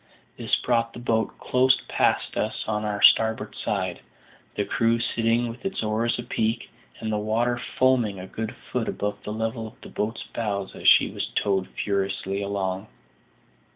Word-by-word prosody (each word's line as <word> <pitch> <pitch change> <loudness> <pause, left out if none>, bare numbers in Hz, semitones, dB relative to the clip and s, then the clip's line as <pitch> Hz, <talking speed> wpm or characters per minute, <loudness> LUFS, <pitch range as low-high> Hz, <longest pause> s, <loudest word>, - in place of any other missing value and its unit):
This - - +1
brought 115 -1 0
the - - -8
boat 115 -2 0
close 130 +1 +3
past - - +1
us - - -1
on 105 -1 -1
our 105 -1 -2
starboard 110 -1 +5
side, 95 -4 -2 0.5
the 100 - 0
crew 115 +3 +2
sitting 115 0 +1
with 115 +1 -7
their 195 0 -3
oars 115 +2 +1
apeak, 115 -1 -2 0.3
and 110 -1 -3
the 105 - 0
water 115 +3 0 0.2
foaming 120 -7 +3
a 90 - -6
good 110 +3 -5 0.2
foot - - -1
above 105 0 -3
the 105 - -5
level 110 +1 -2
of 110 - -15
the - - -10
boat's 105 +2 -3
bows 100 -4 -3
as - - -3
she - - +7
was - - -3
towed 95 -2 0
furiously 100 0 -1
along. 100 0 -2
110 Hz, 165 wpm, -25 LUFS, 100-115 Hz, 0.5 s, she